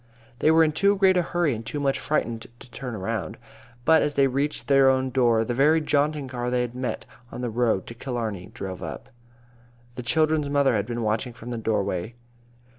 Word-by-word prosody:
They 155 Hz, -, +3 dB
were 160 Hz, +1 st, +6 dB
in 155 Hz, -, +2 dB
too 200 Hz, +6 st, +3 dB
great 190 Hz, -1 st, +4 dB
a 180 Hz, -, +4 dB
hurry 175 Hz, -4 st, 0 dB
and 115 Hz, 0 st, -5 dB
too 130 Hz, +6 st, -4 dB
much 140 Hz, -1 st, 0 dB
frightened 120 Hz, -6 st, -2 dB
to 120 Hz, -, -15 dB
turn 125 Hz, -2 st, -6 dB
around. 105 Hz, -1 st, -4 dB, 0.5 s
But 160 Hz, -1 st, +6 dB
as 145 Hz, -, -1 dB
they 140 Hz, -, +4 dB
reached 140 Hz, +3 st, -2 dB
their 135 Hz, -1 st, +5 dB
own 130 Hz, 0 st, +1 dB
door, 120 Hz, -3 st, +3 dB
the 120 Hz, -, -2 dB
very 150 Hz, +6 st, +4 dB
jaunting 150 Hz, -1 st, 0 dB
car 125 Hz, -1 st, -3 dB
they 125 Hz, 0 st, +1 dB
had 120 Hz, -1 st, -3 dB
met 125 Hz, 0 st, -4 dB, 0.3 s
on 125 Hz, -, -6 dB
the 120 Hz, -2 st, -2 dB
road 115 Hz, -5 st, +1 dB
to -, -, -8 dB
Killarney 115 Hz, -7 st, -4 dB
drove 95 Hz, -1 st, -7 dB
up. 120 Hz, -, -7 dB, 0.8 s
The 125 Hz, -, -6 dB
children's 155 Hz, +4 st, +1 dB
mother 140 Hz, -2 st, +3 dB
had 105 Hz, 0 st, -1 dB
been 120 Hz, -1 st, -3 dB
watching 110 Hz, +3 st, -1 dB
from 120 Hz, +2 st, -9 dB
the 120 Hz, -, -3 dB
doorway. 105 Hz, -1 st, -2 dB
125 Hz, 205 wpm, -25 LUFS, 115-145 Hz, 0.8 s, were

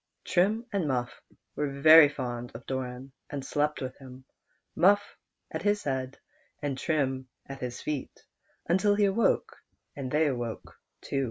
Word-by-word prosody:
Trim 210 Hz, +6 st, +1 dB
and 190 Hz, -6 st, 0 dB
Muff 125 Hz, -3 st, -2 dB, 0.3 s
were 140 Hz, -2 st, -3 dB
very 155 Hz, 0 st, +9 dB
fond 120 Hz, -4 st, -5 dB
of 120 Hz, -, -9 dB
Doran, 130 Hz, 0 st, -5 dB, 0.2 s
and 140 Hz, -2 st, -5 dB
slept 150 Hz, +2 st, 0 dB
with 130 Hz, 0 st, -5 dB
him, 130 Hz, -1 st, -12 dB, 0.5 s
Muff 205 Hz, +4 st, +3 dB, 0.4 s
at -, -, -4 dB
his 205 Hz, 0 st, +1 dB
head, 130 Hz, -1 st, -3 dB, 0.4 s
and 145 Hz, -2 st, -2 dB
Trim 135 Hz, -3 st, -1 dB, 0.2 s
at 135 Hz, 0 st, -8 dB
his 125 Hz, -1 st, -5 dB
feet, 150 Hz, -3 st, -5 dB, 0.4 s
until 195 Hz, +4 st, +3 dB
he 205 Hz, 0 st, +3 dB
awoke, 230 Hz, -, +1 dB, 0.4 s
and 135 Hz, -2 st, -4 dB
then 150 Hz, +4 st, +2 dB
they 145 Hz, -, +2 dB
woke 120 Hz, -3 st, -5 dB, 0.3 s
too. 140 Hz, -, -2 dB
140 Hz, 155 wpm, -28 LUFS, 130-170 Hz, 0.5 s, very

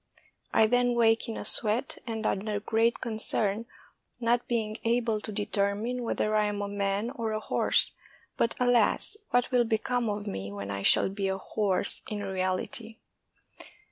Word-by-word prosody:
I 220 Hz, -, +5 dB
then 245 Hz, +1 st, +2 dB
wake 230 Hz, 0 st, +3 dB
in 225 Hz, -, -4 dB
a -, -, -5 dB
sweat 225 Hz, +5 st, +3 dB
and 220 Hz, -1 st, -3 dB
under 205 Hz, +1 st, -1 dB
great 225 Hz, +2 st, +1 dB
concern, 220 Hz, -1 st, -1 dB, 0.5 s
not 240 Hz, 0 st, +1 dB
being 220 Hz, -2 st, -1 dB
able 230 Hz, -2 st, +1 dB
to 215 Hz, -, -5 dB
determine 205 Hz, +4 st, -1 dB
whether 215 Hz, -2 st, 0 dB
I 210 Hz, 0 st, +3 dB
am 205 Hz, -1 st, -3 dB
a -, -, -2 dB
man 200 Hz, +3 st, -1 dB
or 230 Hz, -5 st, -3 dB
a 215 Hz, -, -1 dB
horse; -, -, +2 dB, 0.4 s
but, 230 Hz, -, +1 dB
alas, 245 Hz, -, +2 dB
what 245 Hz, 0 st, +1 dB
will 250 Hz, -1 st, +4 dB
become 230 Hz, +1 st, 0 dB
of 205 Hz, 0 st, -3 dB
me 100 Hz, -, -5 dB
when 100 Hz, 0 st, -5 dB
I 100 Hz, 0 st, -3 dB
shall 100 Hz, -, +4 dB
be 195 Hz, 0 st, -2 dB
a 190 Hz, 0 st, -1 dB
horse 195 Hz, -1 st, -1 dB
in 205 Hz, -1 st, -4 dB
reality? 190 Hz, +4 st, -3 dB
220 Hz, 165 wpm, -28 LUFS, 200-235 Hz, 0.5 s, I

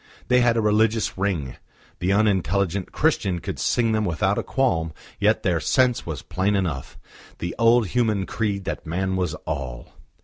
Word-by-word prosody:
They 125 Hz, 0 st, +5 dB
had 120 Hz, -1 st, +3 dB
a -, -, +3 dB
religious 110 Hz, +1 st, +2 dB
ring; 90 Hz, -10 st, -2 dB, 0.4 s
the 90 Hz, +2 st, 0 dB
unintelligent 100 Hz, -2 st, +1 dB
Christian 105 Hz, -, +1 dB
could -, -, -6 dB
sing 115 Hz, -2 st, +1 dB
them 110 Hz, -1 st, +1 dB
without 95 Hz, +2 st, 0 dB
a -, -, 0 dB
qualm; 85 Hz, -, 0 dB, 0.3 s
yet -, -, +2 dB
their -, -, +1 dB
sense 125 Hz, -5 st, +2 dB
was 75 Hz, -6 st, -5 dB
plain 95 Hz, +2 st, 0 dB
enough 85 Hz, -9 st, -3 dB, 0.4 s
the 85 Hz, -, -4 dB
old 115 Hz, 0 st, +5 dB
human 110 Hz, -3 st, +1 dB
creed 100 Hz, +1 st, -2 dB
that -, -, -4 dB
man 95 Hz, +3 st, -1 dB
was 90 Hz, -4 st, -1 dB
all. 65 Hz, -5 st, -5 dB
100 Hz, 165 wpm, -23 LUFS, 85-110 Hz, 0.4 s, They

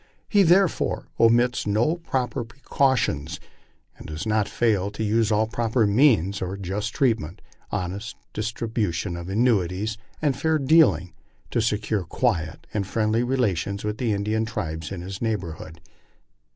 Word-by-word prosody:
He 205 Hz, -, +4 dB
therefore 185 Hz, 0 st, +2 dB
omits 120 Hz, 0 st, +3 dB
no 115 Hz, +11 st, +2 dB
proper 130 Hz, -9 st, -2 dB
precautions, 115 Hz, -, 0 dB, 0.6 s
and -, -, -11 dB
does 80 Hz, +5 st, -5 dB
not 110 Hz, -1 st, +1 dB
fail 105 Hz, -5 st, +1 dB
to 105 Hz, +2 st, -5 dB
use 110 Hz, +1 st, +2 dB
all 110 Hz, +1 st, +3 dB
proper 115 Hz, +1 st, +1 dB
means, 100 Hz, -, +3 dB
by 95 Hz, +1 st, -3 dB
just 100 Hz, +4 st, -3 dB
treatment, 110 Hz, -, 0 dB, 0.3 s
honest 100 Hz, +3 st, -4 dB, 0.2 s
distribution 105 Hz, -5 st, -2 dB
of 85 Hz, +1 st, -7 dB
annuities, 105 Hz, -1 st, +1 dB, 0.2 s
and 145 Hz, -4 st, +1 dB
fair 160 Hz, +3 st, +1 dB
dealing, 135 Hz, -, +4 dB, 0.4 s
to 115 Hz, -, +1 dB
secure 105 Hz, -2 st, 0 dB
quiet 85 Hz, -5 st, -1 dB
and 100 Hz, -3 st, -1 dB
friendly 110 Hz, +2 st, +1 dB
relations 105 Hz, -6 st, 0 dB
with 105 Hz, 0 st, -3 dB
the 120 Hz, -3 st, 0 dB
Indian 105 Hz, +2 st, 0 dB
tribes 80 Hz, -8 st, -4 dB
in 90 Hz, -3 st, -5 dB
his 95 Hz, +1 st, -7 dB
neighborhood. 85 Hz, -7 st, -4 dB
110 Hz, 140 wpm, -24 LUFS, 95-120 Hz, 0.6 s, He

